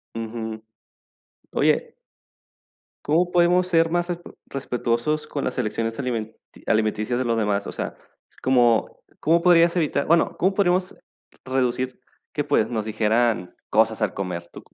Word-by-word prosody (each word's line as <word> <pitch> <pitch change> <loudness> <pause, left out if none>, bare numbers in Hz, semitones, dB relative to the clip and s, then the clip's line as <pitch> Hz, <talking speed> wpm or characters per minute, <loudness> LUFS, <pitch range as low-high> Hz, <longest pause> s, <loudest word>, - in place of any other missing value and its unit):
Ujú. 110 -1 -5 0.9
Oye 470 - +1 1.1
¿cómo 170 +4 +2
podemos 175 +1 +4
ser 165 -2 +3
más 175 +1 0
respe 175 -1 -6 0.2
respetuosos 130 +2 -1
con 140 - -4
las - - -3
elecciones 115 -1 -2
alimenti 115 -4 -3 0.3
alimenticias 110 +2 +1
de 130 - -1
los 115 -1 +1
demás? 105 -2 0
O - - -4
sea, - - -5 0.5
¿cómo 120 -3 +2 0.2
comó 165 +3 +3
podrías 170 -1 +5
evitar 160 -4 +1
Bueno, 170 +1 +3
¿cómo 190 +3 +2
podríamos 185 -1 +1 0.5
reducir 130 -1 -1 0.3
que, - - -1
pues, - - +1
nos 110 -3 -2
dijeran 110 -3 +1
cosas 110 +1 +2
al 105 -3 0
comer, 90 -3 -4
tú - - -10
q - - -30
125 Hz, 145 wpm, -23 LUFS, 110-170 Hz, 1.1 s, podrías